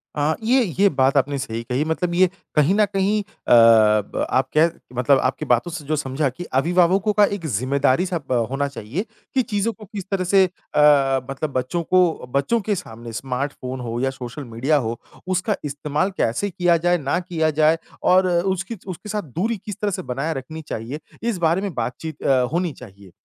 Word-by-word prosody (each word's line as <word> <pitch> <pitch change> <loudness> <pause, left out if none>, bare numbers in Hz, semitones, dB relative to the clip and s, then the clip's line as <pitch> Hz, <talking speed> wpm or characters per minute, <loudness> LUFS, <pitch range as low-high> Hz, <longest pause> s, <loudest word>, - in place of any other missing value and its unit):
अ, 150 +2 +1
ये 250 +3 +4 0.2
ये 200 - +6
बात 135 -2 +2
आपने 140 +1 +1
सही 115 -3 -4
कही 125 +4 -1
मतलब 170 +2 -1
ये 185 +1 +5 0.3
कहीं 150 +5 +4
न 210 0 +4
कहीं 200 +2 +1
अ, - - -39 0.2
ब 110 -3 +5
आप 130 +1 +1
कह, 165 +2 +5 0.3
मतलब 130 +2 +4
आपकी 135 +4 -1
बातों 125 +6 +1
से 160 -4 -6
जो 155 - 0
समझा 140 0 -1
कि 150 +8 -8 0.2
अभिभावकों 180 +6 +2
का 210 0 +5
एक 200 -4 -4
जिम्मेदारी-सा 140 - +1
प 120 -3 +2
होना 140 +1 -1
चाहिए, 140 - -5 0.3
कि 265 - +3
चीज़ों 220 -2 -1
को 215 - -13
किस 205 -1 -7
तरह 190 -2 0
से 190 +2 +4
अ, 145 -6 +3
मतलब 140 +2 -3
बच्चों 130 +7 -1
को 180 -5 +2
बच्चों 140 +12 +2
के 205 +1 -1
सामने 115 -8 -8
स्मार्ट 135 +4 -3
फ़ोन 130 0 -5
हो 120 -1 -4
या 135 - +1
सोशल 130 +1 -7
मीडिया 130 +5 0
हो, 115 -3 -2 0.3
उसका 185 +3 0
इस्तेमाल 150 +6 -1
कैसे 160 - 0
किया 175 -2 +2
जाए? 175 +2 +2
ना 145 +2 -1
किया 170 -3 -1
जाए? 155 +2 +3 0.3
और 185 +1 +4
उसकी 190 +4 -1
उसके 185 +3 -7
साथ 210 0 -1
दूरी 220 +6 0
किस 210 - -5
तरह 205 -1 0
से 185 - -3
बनाए 140 +2 -3
रखनी 155 +4 -7
चाहिए? 120 +7 -5 0.2
इस 230 -5 0
बारे 170 +2 +2
में 200 -5 -3
बातचीत 135 +6 -5
अ, 130 -2 +3
होनी 175 0 0
चाहिए, 100 -6 -14
155 Hz, 195 wpm, -22 LUFS, 130-185 Hz, 0.3 s, ये